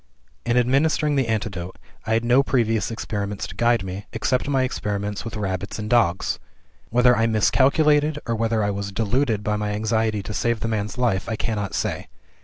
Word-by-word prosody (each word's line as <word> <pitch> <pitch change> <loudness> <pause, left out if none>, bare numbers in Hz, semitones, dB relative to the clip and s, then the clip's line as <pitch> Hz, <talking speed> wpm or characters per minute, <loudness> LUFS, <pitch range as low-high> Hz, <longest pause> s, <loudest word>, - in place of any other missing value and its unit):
"In 120 +1 +2
administering 145 +4 +2
the 135 -4 +1
antidote, 100 -5 -3 0.3
I 110 - +1
had 115 +1 +1
no 125 +3 +5
previous 115 -5 +1
experiments 105 -3 -4
to 90 - -9
guide 120 0 +2
me, 95 +2 -6
except 130 +1 0
my 135 -2 +2
experiments 105 -5 -3
with 115 0 -6
rabbits 95 -1 -3
and 105 -1 -4
dogs. 110 -7 +2 0.5
Whether 125 +1 +4
I 115 - +2
miscalculated 145 +7 +3
or 115 - -1
whether 115 -1 0
I 100 - +1
was 100 0 -4
deluded 110 +1 0
by 105 0 0
my 105 0 -2
anxiety 110 -1 0
to 105 - -6
save 120 0 0
the - - -1
man's 105 0 -2
life, 115 -6 0
I 110 - -1
cannot 105 -2 -3
say. - - -2
110 Hz, 185 wpm, -23 LUFS, 105-125 Hz, 0.5 s, no